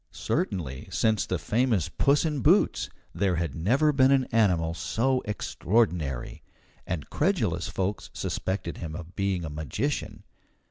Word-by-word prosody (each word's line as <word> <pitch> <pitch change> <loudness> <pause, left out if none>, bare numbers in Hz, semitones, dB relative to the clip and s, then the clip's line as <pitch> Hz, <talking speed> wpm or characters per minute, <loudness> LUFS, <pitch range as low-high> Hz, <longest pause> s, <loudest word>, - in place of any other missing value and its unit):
Certainly, 75 -7 -2
since 110 +3 +1
the 90 - 0
famous 110 - +1
"Puss 140 - +2
in 150 -3 0
Boots," 120 - +3 0.2
there 95 -3 +1
had 85 -4 -2
never 130 - +2
been 135 -2 +4
an 135 -1 +4
animal 90 -8 +2
so 130 +9 0
extraordinary; 90 - -1 0.5
and 85 -4 -4
credulous - - +1
folks 95 +2 -3
suspected 95 -2 -3
him 80 -3 -5
of 90 +1 -9
being 95 -3 -1
a - - -4
magician. 75 -2 -3
95 Hz, 135 wpm, -27 LUFS, 80-115 Hz, 0.5 s, been